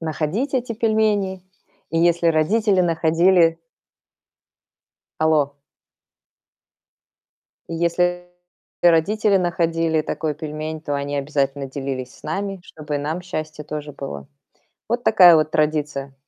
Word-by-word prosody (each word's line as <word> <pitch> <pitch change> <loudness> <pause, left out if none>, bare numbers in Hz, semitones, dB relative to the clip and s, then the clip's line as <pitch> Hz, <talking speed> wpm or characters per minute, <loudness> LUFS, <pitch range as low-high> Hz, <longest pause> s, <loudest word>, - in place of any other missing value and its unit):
находить 165 - -2
эти 245 -2 -1
пельмени. 210 -4 0 0.5
И 165 - 0
если 170 0 +2
родители 190 +5 +2
находили 165 +1 +3 1.7
Алло? 155 -3 +2 2.1
И - - -5
если 175 +1 0 0.5
и 175 - +7
родители 200 +5 +3
находили 165 -3 0
такой 155 0 -3
пельмень, 155 +1 -5
то 145 - -4
они 140 0 -2
обязательно 140 -1 -1
делились 135 -2 -5
с - - -21
нами, 195 -1 -3
чтобы 150 -4 -6
и - - +1
нам 155 +5 -3
счастье 155 -4 -6
тоже 150 0 -6
было. 70 - -7 0.6
Вот 240 +1 -1
такая 180 -6 +7
вот 155 0 +1
традиция. 150 -3 -1
160 Hz, 115 wpm, -21 LUFS, 150-180 Hz, 2.1 s, и